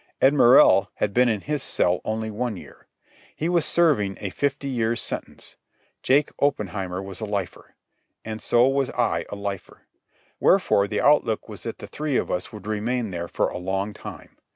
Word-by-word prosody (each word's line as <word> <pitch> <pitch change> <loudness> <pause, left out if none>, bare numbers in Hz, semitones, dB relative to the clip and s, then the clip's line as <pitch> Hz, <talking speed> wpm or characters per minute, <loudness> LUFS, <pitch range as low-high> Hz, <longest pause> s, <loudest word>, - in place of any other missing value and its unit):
Ed 135 +2 +5
Morrell 120 -7 +6
had 100 - -1
been 125 0 +4
in 110 -3 -1
his 150 -1 -2
cell 90 -6 +1
only 110 0 -3
one 110 -1 -3
year. - - -14 0.5
He 160 - -2
was 170 -2 +2
serving 125 - +2
a 100 - -4
fifty 140 +4 -2
years' 120 -3 0
sentence. - - -7 0.4
Jake 140 +3 +2
Oppenheimer 95 -8 -1
was 95 +1 -8
a - - -2
lifer. 100 -3 -5 0.5
And 110 -1 -5
so 120 +1 +4
was 135 -1 +1
I 120 -1 -1
a - - -5
lifer. 100 -2 -6 0.6
Wherefore 100 0 +3
the 105 0 -1
outlook 140 -7 +2
was - - -10
that - - -6
the - - -9
three 150 -3 -2
of - - -2
us 90 - -3
would 105 -2 -10
remain 110 +1 -2
there 85 -1 -4
for - - 0
a - - -6
long 95 +3 -2
time. - - -11
110 Hz, 180 wpm, -24 LUFS, 100-135 Hz, 0.6 s, Morrell